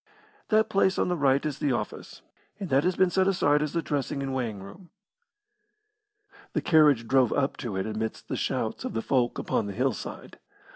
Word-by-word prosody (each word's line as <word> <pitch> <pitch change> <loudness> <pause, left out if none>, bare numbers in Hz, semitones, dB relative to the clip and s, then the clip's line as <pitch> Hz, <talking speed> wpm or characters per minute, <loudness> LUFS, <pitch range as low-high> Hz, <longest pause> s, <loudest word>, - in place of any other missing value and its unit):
That 220 0 +3
place 195 -1 +2
on - - +1
the 180 - +1
right 140 -3 +2
is 150 -3 -3
the 140 -3 +1
office, 110 -3 -5 0.4
and 195 -4 -5
that 135 +2 +4
has 180 0 +1
been 185 -1 +3
set 190 +1 +2
aside 150 -6 +2
as 150 -1 -2
the 170 -1 -1
dressing 140 -1 -2
and 135 -1 -3
weighing 115 -7 -3
room." 175 - -13 1.6
The - - 0
carriage 150 -8 +4
drove 130 -2 +3
up 140 -1 0
to 115 -6 -5
it 95 - -1
amidst 110 0 -4
the - - -3
shouts - - -2
of - - -4
the 115 - -1
folk 125 -3 +1
upon 105 - -1
the 100 - -5
hillside. 125 +2 -4
140 Hz, 195 wpm, -27 LUFS, 120-170 Hz, 1.6 s, that